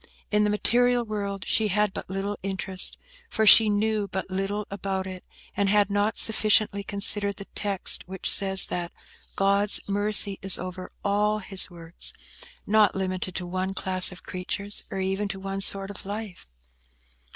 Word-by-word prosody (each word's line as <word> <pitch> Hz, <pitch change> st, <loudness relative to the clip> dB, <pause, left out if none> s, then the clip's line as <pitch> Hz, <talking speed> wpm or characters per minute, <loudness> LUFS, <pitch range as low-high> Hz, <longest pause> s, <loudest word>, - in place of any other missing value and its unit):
In 210 Hz, 0 st, +2 dB
the 210 Hz, -, +1 dB
material 245 Hz, +3 st, +2 dB
world 200 Hz, -3 st, -5 dB
she 220 Hz, +4 st, +2 dB
had 210 Hz, 0 st, 0 dB
but -, -, -8 dB
little 195 Hz, +2 st, -3 dB
interest, 190 Hz, -1 st, -1 dB, 0.3 s
for 220 Hz, -, 0 dB
she 215 Hz, +1 st, +8 dB
knew 210 Hz, 0 st, 0 dB
but 190 Hz, -1 st, -6 dB
little 195 Hz, +2 st, -3 dB
about 195 Hz, -1 st, -4 dB
it, 185 Hz, -1 st, -8 dB, 0.3 s
and 200 Hz, -1 st, 0 dB
had 205 Hz, 0 st, +3 dB
not 205 Hz, +2 st, 0 dB
sufficiently 215 Hz, -2 st, +2 dB
considered 200 Hz, 0 st, +2 dB
the 200 Hz, -, -9 dB
text 200 Hz, -4 st, 0 dB
which 190 Hz, 0 st, -5 dB
says 190 Hz, -1 st, +3 dB
that 175 Hz, -1 st, -4 dB, 0.4 s
"God's 200 Hz, +1 st, +3 dB
mercy 205 Hz, 0 st, +3 dB
is 195 Hz, -1 st, +2 dB
over 185 Hz, 0 st, -7 dB, 0.2 s
all 210 Hz, +1 st, +1 dB
His 195 Hz, -2 st, -1 dB
works;" 170 Hz, -1 st, -8 dB, 0.5 s
not 215 Hz, -1 st, +3 dB
limited 185 Hz, -1 st, -3 dB
to 185 Hz, -, -4 dB
one 185 Hz, +2 st, -4 dB
class 185 Hz, 0 st, +3 dB
of 180 Hz, -, -13 dB
creatures, 200 Hz, +3 st, -3 dB
or -, -, -6 dB
even 195 Hz, +2 st, -2 dB
to 195 Hz, 0 st, -6 dB
one 195 Hz, 0 st, -4 dB
sort 195 Hz, 0 st, +5 dB
of 205 Hz, -, -8 dB
life. 205 Hz, -, -7 dB
200 Hz, 160 wpm, -25 LUFS, 190-210 Hz, 0.5 s, she